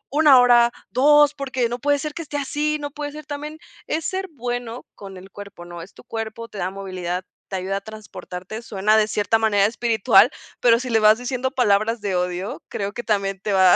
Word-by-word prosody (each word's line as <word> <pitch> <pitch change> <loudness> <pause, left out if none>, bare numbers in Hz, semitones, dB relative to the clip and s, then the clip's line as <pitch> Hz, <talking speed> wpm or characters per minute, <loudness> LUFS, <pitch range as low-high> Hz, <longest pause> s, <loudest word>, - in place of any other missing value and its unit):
una 295 -4 +7
hora, 240 -1 +5 0.2
2, 295 +2 +5
porque 260 -4 -2
no 240 - -4
puede 285 +2 +2
ser 300 +1 -5
que 335 - -6
esté 290 -2 -5
así, 300 +2 -1
no 290 0 -5
puede 290 0 -5
ser 305 0 -9
también" 300 +1 -6 0.3
Es 315 0 -2
ser 380 +1 -2
bueno 245 -2 -5
con 195 -2 -10
el 190 +1 -13
cuerpo, 200 -3 -11
¿no?, 175 -1 -9
es 185 - -12
tu - - -15
cuerpo, 225 +1 -6
te 205 - -9
da 180 - -1
movilidad, 185 -2 -5 0.2
te 190 - -3
ayuda 190 +2 -2
a 200 - -5
transportarte, 215 -1 -9
suena 215 0 +2
de 215 -1 +3
cierta 215 +1 +1
manera 205 -2 +3
espiritual, 225 -2 +4 0.3
pero 230 -1 +4
si 255 0 -5
le 225 -2 +3
vas 215 +2 +5
diciendo 255 +1 -2
palabras 225 -3 +1
de 200 -2 -2
odio, 180 +2 -3
creo 200 +1 -4
que 240 - -6
también 195 -3 -1
te 205 - -2
va 185 -2 +6
225 Hz, 215 wpm, -22 LUFS, 195-265 Hz, 0.3 s, una